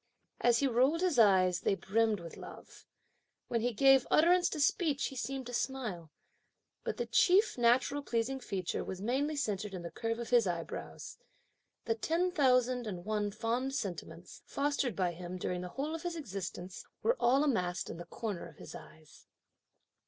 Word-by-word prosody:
As 240 -1 +4
he 280 - +2
rolled 265 +7 +2
his 360 -8 +2
eyes, 185 -4 +5
they 195 - +1
brimmed 215 +2 +1
with 165 -1 -9
love. - - -12 0.6
When 230 -1 0
he 245 +2 +1
gave 270 +3 +5
utterance 350 +3 +4
to 310 - -4
speech, 295 0 +1
he 270 - -10
seemed 265 +2 -4
to 245 - -8
smile. 235 -9 -3 0.7
But - - -3
the 480 - -1
chief 395 +3 +4
natural 250 +4 +2
pleasing 250 0 -1
feature 190 -8 -3
was 190 - -6
mainly 270 +9 0
centred 210 -7 -2
in 175 - -6
the 170 - -6
curve 230 0 -3
of 235 +1 -6
his 235 -4 +5
eyebrows. 170 -2 -5 0.7
The 230 - +1
ten 330 +10 0
thousand 255 -6 +2
and 180 -4 -6
one 210 -1 0
fond 235 +5 -2
sentiments, 175 - -6
fostered 280 -5 -1
by 180 -2 0
him 175 +1 -7
during 180 0 -3
the 180 - -6
whole 285 - -3
of 325 - -4
his 350 -1 -3
existence, 190 - -6 0.2
were 475 - +3
all 265 +4 +4
amassed 185 -10 0
in - - -6
the 175 - -8
corner 205 -7 -5
of 155 -3 -16
his - - -10
eyes. 155 -1 -14
235 Hz, 175 wpm, -32 LUFS, 185-275 Hz, 0.7 s, eyes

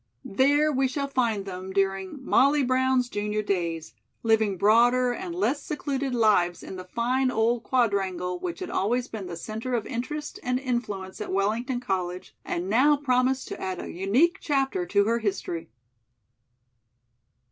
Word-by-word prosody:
There 290 +7 +3
we 265 -1 +2
shall 280 +2 -2
find 235 -7 0
them 185 0 -6
during 195 +6 -1
"MOLLY 280 +2 +4
BROWN'S 255 0 +2
JUNIOR 210 -1 -2
DAYS," 170 -5 -2 0.3
living 220 -3 +2
broader 240 +5 +4
and 345 +6 -5
less 290 -5 0
secluded 275 -3 -3
lives 200 -7 +2
in - - -7
the 185 - -7
fine 250 +6 0
old 230 0 +1
Quadrangle 190 -8 0
which 355 +1 -5
had 365 - -4
always 240 +5 0
been 205 -4 -6
the 170 -1 -6
center 220 +7 -4
of 225 - -2
interest 295 +5 -5
and 250 0 0
influence 220 -8 -3
at - - -4
Wellington 225 +6 0
College 185 -5 -3
and 175 +2 -3
now 265 +8 +4
promised 260 -1 +1
to - - -6
add 185 -1 -3
a - - -6
unique 245 - +2
chapter 290 +5 0
to 200 - +3
her 230 +3 +1
history. 175 -6 -3
235 Hz, 155 wpm, -26 LUFS, 195-265 Hz, 0.3 s, MOLLY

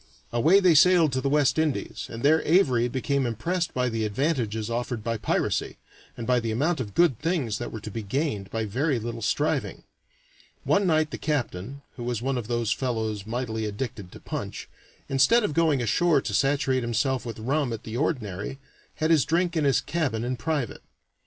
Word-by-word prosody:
Away 155 +12 +5
they 185 -3 +5
sailed 165 0 +5
to 130 0 -1
the 140 - 0
West 145 0 +3
Indies, 155 -3 -2
and 115 - -7
there 155 +3 +5
Avary 130 -9 +3
became 135 0 0
impressed 165 - -2
by 125 0 0
the 115 -2 -1
advantages 110 -2 -1
offered 120 -1 -3
by 115 0 -1
piracy, 105 - -1 0.4
and 115 - -5
by 125 0 +3
the 115 -1 -3
amount 145 +9 0
of 105 -6 -5
good 170 -10 +3
things 145 - -1
that 120 - -5
were 110 - -6
to 110 - -7
be 115 - -4
gained 105 -2 -2
by 110 +1 -2
very 130 +7 0
little 115 0 -5
striving. 145 +8 -1 0.8
One 200 -1 +2
night 155 -2 +2
the - - -5
captain 140 - -3
(who 120 - -5
was 120 -2 -2
one 130 +1 -1
of 110 - -7
those 120 -2 -1
fellows 110 -5 -2
mightily 110 -2 -2
addicted 105 -3 -5
to - - -10
punch), - - -6 0.4
instead 135 - +4
of 180 - -1
going 155 -5 +2
ashore 155 +7 +3
to - - -4
saturate 135 -1 +2
himself 120 +2 0
with 115 -2 -6
rum 135 +4 0
at 115 - -5
the 110 - -6
ordinary, 120 - -2 0.4
had 155 +1 0
his 155 -5 +5
drink 170 +1 0
in 155 -3 +1
his 140 - +3
cabin 140 -10 -1
in 125 +1 -1
private. 145 -2 -2
130 Hz, 190 wpm, -26 LUFS, 115-155 Hz, 0.8 s, Away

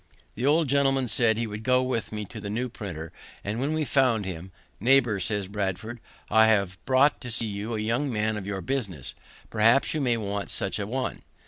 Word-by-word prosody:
The 125 +5 -1
old 155 +1 +4
gentleman 135 -1 +2
said 110 0 +2
he 115 - 0
would 105 -1 -6
go 125 +2 +3
with 125 -3 -2
me 105 -1 -4
to 110 - -9
the 100 -1 -6
new 120 +4 -2
printer; 85 -9 -7 0.3
and 105 +3 -3
when 140 +4 0
we 155 -1 0
found 125 -7 +2
him, 90 0 -6 0.3
"Neighbour," 120 -2 +4
says 100 +1 -1
Bradford, 105 +4 -3 0.3
"I 110 +1 +5
have 100 -5 +1
brought 135 +2 +4
to 125 - -6
see 115 0 -1
you 105 +2 -3
a - - -2
young 120 +6 0
man 110 -1 0
of 100 -2 -5
your 100 -2 -3
business; 95 - -3 0.4
perhaps 115 +4 +4
you 155 - -1
may 120 -3 +2
want 100 -2 -3
such 95 - -2
a 100 - -2
one." 130 +3 -3
110 Hz, 210 wpm, -27 LUFS, 100-130 Hz, 0.4 s, I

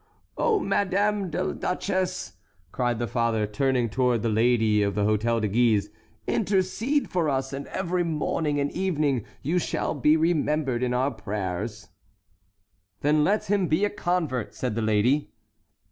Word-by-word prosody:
"Oh, 440 -3 +2
Madame 200 - 0
la 155 - -1
Duchesse!" 185 0 -2 0.4
cried 120 -2 0
the 120 - -1
father, 115 -2 0
turning 125 +3 0
toward 120 0 +1
the 115 - +1
lady 110 -1 +3
at 100 0 -1
the 105 - +1
Hôtel 110 +2 +1
de 105 - +1
Guise, 105 -1 +2 0.3
"intercede 215 +7 0
for 170 -4 0
us, 135 -1 -1
and 140 +1 -5
every 180 -1 -1
morning 150 -2 -1
and 140 0 0
evening 150 - 0 0.2
you 170 +6 +1
shall - - -2
be 150 +2 +3
remembered 150 -6 +1
in 125 -1 0
our 130 +3 +1
prayers." 100 -1 -4 1.1
"Then 150 +1 +3
let 205 +6 +1
him 195 -2 +1
be 160 +7 +2
a 205 - -1
convert," 175 - -2
said 125 -4 -2
the 115 - -2
lady. 110 +7 +1
140 Hz, 150 wpm, -26 LUFS, 115-180 Hz, 1.1 s, lady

